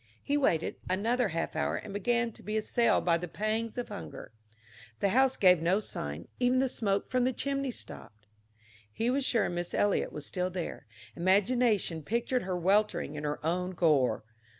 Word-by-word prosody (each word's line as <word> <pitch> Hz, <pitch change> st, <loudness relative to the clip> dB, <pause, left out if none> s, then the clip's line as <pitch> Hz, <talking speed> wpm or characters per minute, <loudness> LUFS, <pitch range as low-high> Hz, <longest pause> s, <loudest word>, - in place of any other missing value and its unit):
He 285 Hz, -, 0 dB
waited 175 Hz, -, +1 dB
another 225 Hz, +6 st, +1 dB
half 165 Hz, -2 st, -3 dB
hour 160 Hz, -, 0 dB
and 210 Hz, -, -6 dB
began 235 Hz, +3 st, 0 dB
to -, -, -12 dB
be 215 Hz, +1 st, -2 dB
assailed 230 Hz, +1 st, +2 dB
by 170 Hz, -1 st, +3 dB
the 180 Hz, -, -5 dB
pangs 215 Hz, +5 st, -2 dB
of 245 Hz, -, -3 dB
hunger. 80 Hz, -3 st, -8 dB, 0.7 s
The 200 Hz, -, +2 dB
house 260 Hz, +5 st, +3 dB
gave 180 Hz, -4 st, +5 dB
no 180 Hz, +5 st, +2 dB
sign; 75 Hz, -, -4 dB
even 250 Hz, +1 st, +3 dB
the 265 Hz, +1 st, +3 dB
smoke 200 Hz, -4 st, -1 dB
from 255 Hz, -1 st, +1 dB
the 255 Hz, -, +2 dB
chimney 275 Hz, +1 st, -2 dB
stopped. 110 Hz, -, -8 dB, 0.7 s
He 230 Hz, -, 0 dB
was 275 Hz, +2 st, 0 dB
sure 230 Hz, -5 st, +2 dB
Miss 175 Hz, 0 st, -3 dB
Eliot 205 Hz, -1 st, +1 dB
was 150 Hz, -1 st, -6 dB
still 180 Hz, +3 st, -1 dB
there; 180 Hz, -9 st, -5 dB, 0.3 s
imagination 200 Hz, -1 st, +2 dB
pictured 235 Hz, -, -1 dB
her 185 Hz, -1 st, -2 dB
weltering 200 Hz, +5 st, +1 dB
in 150 Hz, 0 st, -5 dB
her 150 Hz, +1 st, -3 dB
own 180 Hz, +3 st, -1 dB
gore. 155 Hz, -10 st, +2 dB
200 Hz, 175 wpm, -30 LUFS, 170-240 Hz, 0.7 s, gave